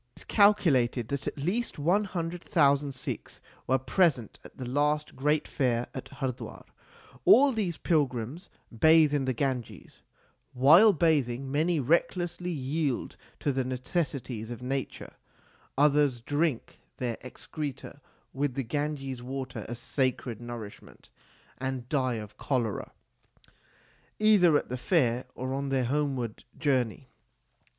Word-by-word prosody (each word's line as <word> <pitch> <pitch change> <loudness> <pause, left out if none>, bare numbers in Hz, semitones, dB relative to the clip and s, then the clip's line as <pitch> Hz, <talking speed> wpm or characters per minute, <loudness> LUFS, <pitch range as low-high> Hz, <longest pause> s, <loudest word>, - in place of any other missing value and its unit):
It - - -9
is - - -8
calculated 145 - +3
that 140 -1 -3
at - - -3
least 185 +12 -2
one 180 +8 +2
hundred 175 -2 -4
thousand 140 -2 +2
Sikhs 130 - -6 0.3
were 130 - +3
present 130 - +1
at - - -14
the 130 - -6
last 150 +3 0
great 150 +3 +1
fair 125 -3 0
at 130 - -6
Hardwar. 130 -2 -5 0.6
All 285 -7 +7
these 195 -7 -2
pilgrims 145 - -1 0.3
bathe 155 +3 +5
in 140 -2 +1
the 130 - 0
Ganges; 125 -2 -4 0.5
while 160 - +7
bathing 140 -7 +1
many 160 +3 +1
recklessly 175 +5 0
yield 145 -3 -2 0.3
to 145 - +1
the 135 -1 0
necessities 130 -3 -3
of 120 0 -7
nature; 135 +1 -4 0.6
others 145 -3 +3
drink 145 +1 -2 0.2
their 120 -3 -3
excreta 145 +2 -7 0.3
with 135 -1 -1
the 135 - -1
Ganges 135 0 -3
water 130 +1 -6
as 120 - -4
sacred 125 -2 -2
nourish 120 -3 -7
ment, - - -18 0.5
and 130 -2 -4
die 130 -4 +1
of 105 -2 -8
cholera 120 -6 -2 1.3
either 200 -8 +5
at - - -4
the 125 +1 -4
fair 125 -7 +1
or 130 +1 -4
on 140 0 -2
their 130 -2 +1
homeward 135 -4 -2
journey. 130 -3 -1
135 Hz, 130 wpm, -28 LUFS, 125-155 Hz, 1.3 s, All